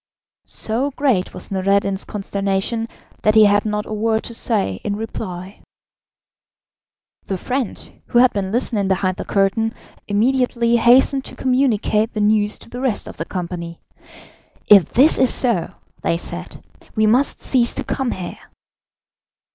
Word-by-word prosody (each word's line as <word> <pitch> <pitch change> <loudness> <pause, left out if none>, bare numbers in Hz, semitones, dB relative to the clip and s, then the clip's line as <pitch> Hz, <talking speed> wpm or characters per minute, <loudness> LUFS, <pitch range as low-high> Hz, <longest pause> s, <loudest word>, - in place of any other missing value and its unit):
So 240 +6 -2
great 260 -9 0
was - - -4
Noureddin's 195 0 +1
consternation 200 +2 -2 0.3
that 215 0 +2
he 215 -1 +8
had 205 +1 +3
not 210 -1 -2
a - - -6
word 220 +1 0
to 235 - -5
say 205 - 0
in 205 - -2
reply. 195 -3 -6 1.6
The 190 - -3
friend, 250 +4 -4
who - - 0
had 250 +1 +5
been 195 -2 -2
listening 220 -3 0
behind 185 -1 0
the - - -5
curtain, 210 +3 +1 0.3
immediately 235 +2 +2
hastened 260 +3 +4
to - - -8
communicate 240 -4 +1
the - - -1
news 210 0 +2
to - - -15
the 245 - -6
rest 260 -5 -1
of - - -10
the 165 - -4
company. 170 -2 -5 0.9
"If 200 -6 +6
this 280 +6 +4
is 260 - +4
so," 235 -10 +1 0.3
they 165 - 0
said, - - -9 0.3
"we 215 -1 +3
must 245 +6 +2
cease 240 -3 +1
to - - -2
come 265 -2 -2
here." 180 -5 -6
215 Hz, 145 wpm, -20 LUFS, 195-240 Hz, 1.6 s, he